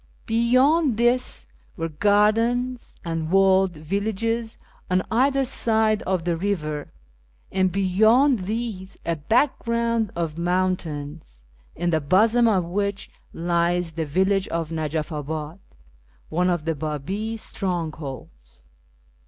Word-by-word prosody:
Beyond 255 Hz, +4 st, +3 dB
this 240 Hz, +2 st, +1 dB, 0.3 s
were 165 Hz, -1 st, -2 dB
gardens 225 Hz, +8 st, +1 dB
and 165 Hz, -1 st, -2 dB
walled 190 Hz, 0 st, +4 dB
villages 220 Hz, +7 st, -2 dB, 0.3 s
on 185 Hz, 0 st, +2 dB
either 270 Hz, +4 st, +2 dB
side 220 Hz, -4 st, +1 dB
of 185 Hz, -3 st, 0 dB
the 175 Hz, -1 st, +1 dB
river, 155 Hz, -5 st, -3 dB, 0.6 s
and 185 Hz, -1 st, +1 dB
beyond 215 Hz, -, +3 dB
these 215 Hz, -3 st, -4 dB
a 170 Hz, -, 0 dB
background 230 Hz, -, +1 dB
of 165 Hz, -1 st, -3 dB
mountains, 165 Hz, -, -2 dB, 0.3 s
in 175 Hz, +1 st, -1 dB
the 160 Hz, -1 st, +1 dB
bosom 220 Hz, +10 st, +4 dB
of 190 Hz, -6 st, +2 dB
which 200 Hz, +3 st, -3 dB, 0.2 s
lies 170 Hz, 0 st, 0 dB
the 160 Hz, -1 st, -3 dB
village 190 Hz, +5 st, +1 dB
of 165 Hz, -1 st, -3 dB
Najaf 155 Hz, 0 st, -2 dB
abad, 155 Hz, +3 st, -5 dB, 0.7 s
one 180 Hz, +3 st, +1 dB
of 175 Hz, -3 st, -1 dB
the 165 Hz, -, +1 dB
Babi 160 Hz, +10 st, -4 dB
strong 180 Hz, -6 st, -2 dB
holds. 65 Hz, -, -10 dB
185 Hz, 115 wpm, -24 LUFS, 165-220 Hz, 0.7 s, walled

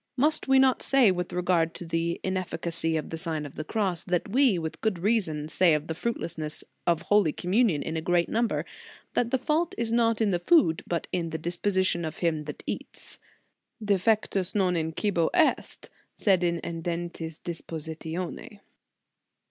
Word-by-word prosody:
Must 305 Hz, +4 st, +2 dB
we 270 Hz, 0 st, +5 dB
not 265 Hz, -1 st, +4 dB
say, 265 Hz, -7 st, +5 dB
with 180 Hz, -1 st, -3 dB
regard 175 Hz, -2 st, +1 dB
to 175 Hz, -, -7 dB
the 165 Hz, +1 st, -1 dB
inefficacy 170 Hz, -3 st, -1 dB
of 155 Hz, -, -5 dB
the 165 Hz, -, -4 dB
Sign 160 Hz, -2 st, -3 dB
of 145 Hz, -, -9 dB
the 155 Hz, -, -5 dB
Cross, 190 Hz, -1 st, -2 dB
what 180 Hz, +1 st, 0 dB
we, 250 Hz, -3 st, +4 dB
with 160 Hz, -1 st, -5 dB
good 215 Hz, -5 st, 0 dB
reason, 170 Hz, -6 st, 0 dB
say 165 Hz, +1 st, +4 dB
of 150 Hz, 0 st, -2 dB
the 160 Hz, -, -3 dB
fruitlessness 160 Hz, -6 st, -3 dB, 0.2 s
of 170 Hz, -1 st, +2 dB
Holy 205 Hz, -3 st, +3 dB
Com 175 Hz, +4 st, -5 dB
munion 200 Hz, -, +3 dB
in 160 Hz, -, -4 dB
a 160 Hz, -, -1 dB
great 175 Hz, +1 st, +2 dB
number 230 Hz, +1 st, 0 dB, 0.5 s
that 235 Hz, -, +1 dB
the 265 Hz, -, +2 dB
fault 305 Hz, +6 st, 0 dB
is 230 Hz, -1 st, -1 dB
not 230 Hz, -1 st, +2 dB
in 215 Hz, -3 st, +2 dB
the 175 Hz, -, +1 dB
food, 175 Hz, -, +4 dB
but 170 Hz, -1 st, -2 dB
in 170 Hz, -2 st, -1 dB
the 160 Hz, -, -3 dB
disposition 175 Hz, +2 st, 0 dB
of 155 Hz, -, -5 dB
him 160 Hz, -3 st, 0 dB
that 150 Hz, -, -7 dB
eats: -, -, -6 dB, 0.6 s
Defectus 205 Hz, -2 st, +1 dB
non 185 Hz, -3 st, +2 dB
in 160 Hz, -1 st, -1 dB
cibo 170 Hz, -1 st, +1 dB
est> 330 Hz, -3 st, +1 dB, 0.3 s
sed 190 Hz, -4 st, +2 dB
in 170 Hz, -1 st, +1 dB
edentis 170 Hz, -1 st, -4 dB
dispositione 165 Hz, +4 st, -5 dB
175 Hz, 175 wpm, -27 LUFS, 165-210 Hz, 0.6 s, we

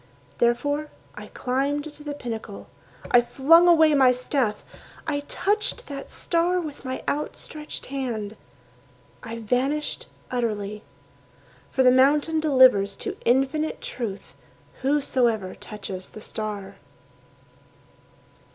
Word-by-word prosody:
Therefore 285 Hz, +6 st, +1 dB, 0.2 s
I -, -, -9 dB
climbed 285 Hz, +4 st, -2 dB
to 295 Hz, -, -13 dB
the 295 Hz, -1 st, -5 dB
pinnacle. 225 Hz, -6 st, -6 dB, 0.5 s
I 245 Hz, -, +7 dB
flung 325 Hz, +8 st, +5 dB
away 320 Hz, -3 st, +6 dB
my 260 Hz, -3 st, +6 dB
staff. 250 Hz, -3 st, -1 dB, 0.4 s
I 295 Hz, -3 st, -1 dB
touched 425 Hz, +4 st, 0 dB
that 280 Hz, -1 st, -7 dB
star 345 Hz, +1 st, +1 dB
With 305 Hz, -4 st, -7 dB
my 260 Hz, -1 st, -4 dB
outstretched 300 Hz, +1 st, -4 dB
hand. 235 Hz, -6 st, -4 dB, 0.9 s
I 230 Hz, +1 st, -6 dB
vanished 260 Hz, +7 st, -1 dB, 0.2 s
utterly. 210 Hz, -4 st, -2 dB, 0.9 s
For 265 Hz, -, +2 dB
the 250 Hz, -, +7 dB
mountain 290 Hz, +5 st, +4 dB
delivers 255 Hz, -10 st, +5 dB
to -, -, -4 dB
Infinite 270 Hz, +5 st, +1 dB
Truth 215 Hz, -6 st, -6 dB, 0.5 s
Whosoever 255 Hz, -8 st, +1 dB
touches 195 Hz, -3 st, -7 dB
the 215 Hz, -, -11 dB
star. 205 Hz, -3 st, -5 dB
260 Hz, 105 wpm, -25 LUFS, 225-295 Hz, 0.9 s, I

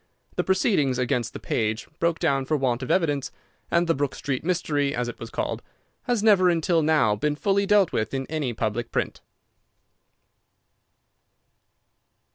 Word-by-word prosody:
The -, -, 0 dB
proceedings 185 Hz, -, +2 dB
against 120 Hz, -2 st, 0 dB
the -, -, -8 dB
page 110 Hz, 0 st, -2 dB
broke 170 Hz, 0 st, +1 dB
down 135 Hz, -5 st, +1 dB
for 155 Hz, +3 st, +1 dB
want 130 Hz, -3 st, 0 dB
of 130 Hz, -, -5 dB
evidence, 145 Hz, -7 st, +1 dB, 0.4 s
and 170 Hz, +1 st, +2 dB
the 165 Hz, -, +2 dB
Brook 140 Hz, -1 st, -2 dB
Street 135 Hz, -3 st, -3 dB
Mystery, 155 Hz, -5 st, 0 dB
as 120 Hz, 0 st, -1 dB
it 120 Hz, -, -7 dB
was 115 Hz, -, -7 dB
called, -, -, -3 dB, 0.4 s
has 240 Hz, -4 st, 0 dB
never 195 Hz, -4 st, +5 dB
until 170 Hz, 0 st, +2 dB
now 150 Hz, -9 st, +3 dB
been 150 Hz, +8 st, -1 dB
fully 200 Hz, +5 st, +1 dB
dealt 205 Hz, -3 st, +4 dB
with 110 Hz, -1 st, -1 dB
in 135 Hz, -1 st, -2 dB
any 150 Hz, -4 st, -2 dB
public 115 Hz, +1 st, -3 dB
print. -, -, -2 dB
145 Hz, 155 wpm, -25 LUFS, 125-175 Hz, 0.4 s, never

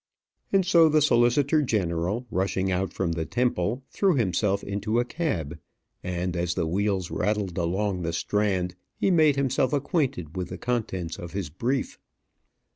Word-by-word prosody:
And 195 Hz, -2 st, +3 dB
so 170 Hz, -3 st, +6 dB
the 155 Hz, 0 st, +4 dB
solicitor 140 Hz, +2 st, +3 dB
general, 100 Hz, -, -1 dB
rushing 95 Hz, 0 st, 0 dB
out 95 Hz, +1 st, -1 dB
from 90 Hz, -3 st, -1 dB
the 80 Hz, -1 st, -2 dB
Temple, 120 Hz, 0 st, 0 dB
threw 195 Hz, -4 st, +2 dB
himself 100 Hz, -3 st, +1 dB
into 105 Hz, +3 st, -1 dB
a 120 Hz, -, +1 dB
cab; 85 Hz, -, -3 dB, 0.4 s
and 90 Hz, 0 st, -2 dB
as 85 Hz, 0 st, -1 dB
the 85 Hz, -, 0 dB
wheels 95 Hz, +1 st, -1 dB
rattled 105 Hz, -4 st, -1 dB
along 95 Hz, +2 st, -1 dB
the 85 Hz, -1 st, -2 dB
Strand, 95 Hz, 0 st, 0 dB, 0.2 s
he 195 Hz, -, +1 dB
made 155 Hz, -5 st, +5 dB
himself 135 Hz, -1 st, +1 dB
acquainted 135 Hz, -, -1 dB
with 90 Hz, -1 st, -3 dB
the -, -, -6 dB
contents 100 Hz, -8 st, -3 dB
of 85 Hz, -1 st, -8 dB
his 95 Hz, -7 st, -4 dB
brief. 125 Hz, -, -2 dB
100 Hz, 155 wpm, -26 LUFS, 90-130 Hz, 0.4 s, so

